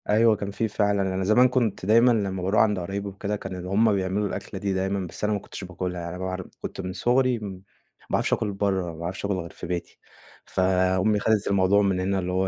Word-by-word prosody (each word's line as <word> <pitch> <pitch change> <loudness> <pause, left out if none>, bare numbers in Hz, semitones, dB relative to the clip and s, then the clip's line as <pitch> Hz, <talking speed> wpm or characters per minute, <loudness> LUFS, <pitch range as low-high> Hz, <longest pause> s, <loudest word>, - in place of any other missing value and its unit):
أيوه 110 +1 +5
كان 100 -1 -4
في 110 +3 -1
فعلًا، 100 -1 +1
أنا 95 0 -1
زمان 110 +6 +5
كنت 115 -8 0
دايمًا 115 +4 +6
لمّا 100 -5 0
باروح 95 +4 +3
عند 105 -3 +2
قرايبي 100 +3 -4
وكده 100 +1 -3
كانوا 95 -2 -6
اللي 90 +1 -6
هم 110 +2 +4
بيعملوا 100 +1 0
الأكلة 100 0 -6
دي 100 0 -1
دايمًا، 95 0 -1
بس - - -10
أنا 105 0 +2
ما 100 - 0
كنتش 100 - -9
باكلها 90 -1 -4
يعني 85 +1 -5
مابعر 95 0 -4
كنت - - -5
من 90 0 -5
صغري 125 +2 +2
م - - -9
ما 95 -1 -11 0.6
باعرفش - - 0
آكل 110 -3 0
برّه، 95 -3 -1
ما - - -11
باعرفش 90 +4 -4
آكل 100 - 0
غير 90 -3 -4
في 85 - -9
بيتي. 90 -1 -4 0.5
فأمي 95 +2 +2
خدت 105 0 +1
الموضوع 100 +1 +4
من 95 -2 +1
هنا 95 +1 0
اللي 90 0 -2
هو 95 +1 +1
95 Hz, 230 wpm, -25 LUFS, 95-105 Hz, 0.6 s, دايمًا